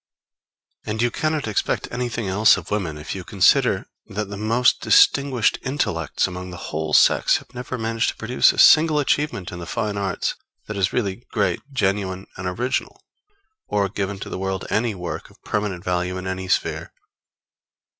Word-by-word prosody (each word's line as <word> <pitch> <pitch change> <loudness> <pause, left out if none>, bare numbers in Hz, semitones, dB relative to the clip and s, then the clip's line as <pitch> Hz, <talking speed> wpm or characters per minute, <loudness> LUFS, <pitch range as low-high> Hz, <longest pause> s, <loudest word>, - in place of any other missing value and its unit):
And 110 +1 -4
you 120 +1 +2
cannot 155 -2 -1
expect 105 - -1
anything 120 -3 -3
else 100 +4 +5
of - - -9
women 90 -8 -2
if 75 - -6
you - - -6
consider - - +3 0.2
that 105 0 -4
the - - -4
most 115 +4 +2
distinguished 135 -5 +4
intellects 105 - -1
among 90 0 -6
the 90 - -8 0.2
whole 80 0 -2
sex - - +5
have - - -14
never 125 +1 -5
managed 115 0 0
to - - -5
produce 120 +3 +3
a - - -10
single 155 -1 +6
achievement 145 -9 0
in 90 - -7
the 85 - -7
fine 105 -2 -2
arts 95 -2 -1 0.3
that 105 - -6
is 95 -2 +1
really 105 0 -2
great, 105 -4 0
genuine, 95 -5 -1
and 95 - -5
original; 120 +8 -2 0.7
or 100 -1 0
given 100 0 -3
to - - -6
the - - -5
world 95 0 -3
any 115 -1 0
work 90 -2 -6
of - - -22
permanent 105 -4 -2
value 90 0 -1
in 95 - -6
any 95 0 -4
sphere. - - -1
105 Hz, 175 wpm, -22 LUFS, 95-120 Hz, 0.7 s, single